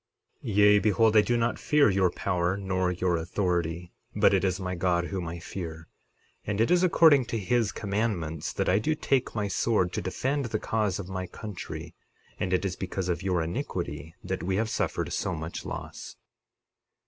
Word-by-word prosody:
60:28 105 - -3
Yea, 105 0 +6
behold 110 +1 +3
I 105 - +8
do 120 +3 +1
not 115 0 0
fear 150 -1 +4
your 95 -1 +3
power 90 +1 -1
nor 95 -2 0
your 90 -1 0
authority, 85 -1 -2 0.2
but - - +4
it 95 -1 +2
is 95 -1 0
my 90 -1 -3
God 85 -1 +1
whom 90 -1 -4
I 85 +1 -5
fear; 85 -1 -7 0.5
and 100 0 -3
it 115 - +3
is 180 0 +5
according 160 -7 +5
to 115 - -3
his 110 +1 +1
commandments 100 -7 -2
that - - -2
I 95 +3 +4
do 155 +8 0
take 135 -5 0
my 105 -2 0
sword 95 -1 +1
to - - -2
defend 135 +10 -1
the 110 -2 -1
cause 105 -4 -1
of 100 - -6
my 95 -1 -4
country, 105 -2 -7 0.5
and 95 - -1
it 90 +1 +1
is 90 -2 -2
because 95 0 -3
of 85 -3 -1
your 90 -3 0
iniquity 85 - -4
that 95 0 -3
we 95 +1 -1
have 110 +2 0
suffered - - -1
so - - -1
much 80 +1 -6
loss. - - -7
95 Hz, 190 wpm, -28 LUFS, 90-110 Hz, 0.5 s, I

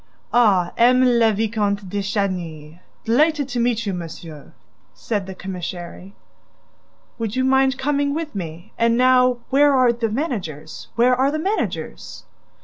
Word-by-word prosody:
"Ah, 200 -7 +3
M. 250 +2 +5
le 235 -3 +4
Vicomte 205 -2 -1
de 200 +2 -3
Chagny! 175 -6 -4 0.3
Delighted 290 +4 +2
to 245 -1 -2
meet 235 -1 0
you, 200 - -2
monsieur," 165 -3 -9 0.4
said 205 -4 -3
the 190 - -7
commissary. 180 0 -7 1.0
"Would 225 -1 -3
you 260 - +1
mind 265 0 +3
coming 285 +1 0
with 320 -1 -4
me?... 170 -3 -7
And 230 0 +3
now 255 0 +4
where 285 +2 +5
are 250 -2 +4
the 230 -1 -2
managers?... 195 - -5
Where 245 +2 +4
are 265 +2 +2
the 305 - -2
managers?" 390 +7 -4
230 Hz, 145 wpm, -21 LUFS, 190-255 Hz, 1.0 s, M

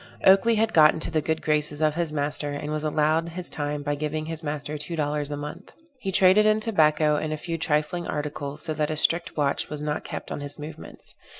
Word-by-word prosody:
Oakley 195 +5 +6
had 220 +1 +1
got 155 -1 +7
into 160 - -4
the 155 -1 +1
good 160 +1 -2
graces 150 -1 0
of 155 -1 +2
his 170 -1 -2
master, 145 0 -2
and 145 +1 -4
was 155 0 -2
allowed 155 +2 +1
his 175 +1 -5
time 145 -1 -3
by 145 0 -1
giving 155 +1 -3
his 160 0 -5
master 150 -1 -4
two 150 +3 -4
dollars 150 -1 -1
a 145 - -3
month. 150 +6 -8 0.3
He 195 -6 -3
traded 190 +3 +5
in 215 0 +4
tobacco 155 -8 +3
and 155 +1 -2
a 155 - -2
few 165 +1 -4
trifling 160 +3 0
articles, 145 0 -3
so 155 - -1
that 150 -1 -1
a 155 - -1
strict 170 +3 +1
watch 140 -2 0
was 150 - -5
not 150 0 -2
kept - - -7
on - - -4
his 145 0 -7
movements. 150 - -10
155 Hz, 225 wpm, -25 LUFS, 150-165 Hz, 0.3 s, got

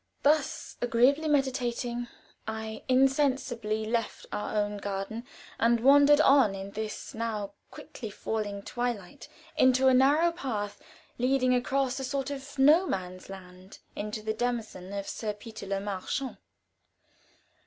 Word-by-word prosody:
Thus 290 -1 +1
agreeably 250 +6 +3
meditating, 245 -4 0 0.4
I 220 0 -5
insensibly 255 -5 +2
left 230 0 -2
our 210 - -3
own 205 0 0
garden 205 +4 -4 0.3
and 235 0 +4
wandered 285 +4 +6
on 270 -9 +5
in 195 +1 -7
the 215 +1 -3 0.2
now 220 -3 -3 0.2
quickly 225 - -9
falling 205 -1 -4
twilight 240 -6 -4 0.3
into 260 +1 +5
a - - +4
narrow 290 +6 +5
path 225 -11 -4 0.4
leading 255 0 +3
across 265 +1 0
a - - -4
sort 270 +1 -2
of 280 +1 -7
No 305 +7 +6
Man's 185 - -4
Land 185 0 -11 0.2
into 210 +1 -4
the 220 0 -1
demesne 220 -5 -3
of 200 -1 -4
Sir 215 -2 -3
Peter 210 -1 -10
Le 195 0 -1
Marchant. 205 +7 -3
235 Hz, 130 wpm, -29 LUFS, 210-270 Hz, 0.4 s, wandered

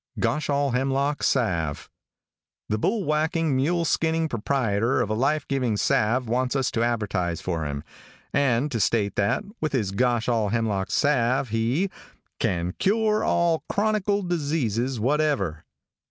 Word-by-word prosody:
GOSHALLHEMLOCK 140 -1 0
SALVE. 85 - 0 0.8
|THE 110 - 0
bullwacking, 160 - 0
mule 165 +6 +1
skinning 160 0 +1
proprieter 115 -2 0
of 110 -4 0
a - - +2
life 135 +7 0
giving 125 -6 0
salve 120 +5 +1
wants 125 +3 0
us 135 -2 +1
to 115 - -1
advertise 105 -8 -1
for 85 -4 -3
him, 70 0 -4 0.5
and 140 0 +2
to 115 - -1
state 105 0 +1
that, 100 - +1 0.2
with 155 -2 -1
his 110 -8 0
Goshallhemlock 115 -3 0
salve 130 -3 +1
he 120 - 0 0.5
"can 90 0 -1
cure 215 +1 +2
all 170 -2 +1
chronicle 205 -1 +1
diseases 140 - -1
whatever." 130 - 0
130 Hz, 125 wpm, -25 LUFS, 110-150 Hz, 0.8 s, a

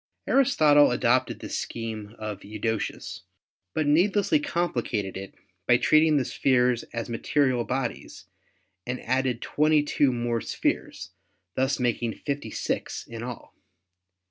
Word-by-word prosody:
Aristotle 155 - +5
adopted 125 +1 +1
this - - -3
scheme 110 -2 -6
of 105 -2 -6
Eudoxus, 110 +1 -4 0.5
but 155 - +1
need 170 +8 +3
lessly 290 +9 +2
complicated 120 - -2
it 95 0 -8 0.3
by 120 - +6
treating 155 +3 +4
the 130 - +1
spheres 125 -2 +2
as 115 -1 -4
material 125 +1 +1
bodies 130 -1 -4 0.6
and 125 0 -3
added 130 -1 0
22 150 -2 +2
more 120 -1 -1
spheres, - - -3 0.4
thus 130 +2 0
making 120 -2 0
56 140 -1 -4
in 115 -1 -8
all. 120 -1 -8
125 Hz, 115 wpm, -26 LUFS, 115-145 Hz, 0.6 s, by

